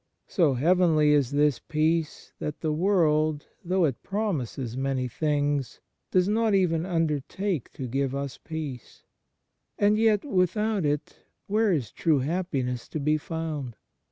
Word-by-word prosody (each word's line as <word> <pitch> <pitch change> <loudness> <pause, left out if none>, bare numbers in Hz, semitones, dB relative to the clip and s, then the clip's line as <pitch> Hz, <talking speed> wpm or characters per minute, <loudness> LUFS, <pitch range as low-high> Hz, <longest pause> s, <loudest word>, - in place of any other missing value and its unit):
So 160 -9 +2
heavenly 160 +1 +4
is 145 -4 +3
this 145 -1 +2
peace 155 +1 -1
that 150 - -5
the 155 - 0
world, 155 -4 +2 0.2
though 180 0 +2
it 135 -6 -2
promises 140 - -3
many 135 -1 -1
things, 145 0 -1 0.3
does 185 0 +3
not 220 0 +2
even 175 -3 +1
undertake 165 - -1
to 130 - -5
give 135 +2 -1
us 140 -2 -4
peace. 150 -7 -7 0.7
And 210 +1 +3
yet 220 -1 +3
without 205 - +1
it 145 +1 -3 0.2
where 215 +1 +2
is 140 -10 -1
true 160 -3 +2
happiness 135 -6 -2
to 155 - -4
be 150 +2 +1
found 150 -6 -4
155 Hz, 135 wpm, -26 LUFS, 140-185 Hz, 0.7 s, heavenly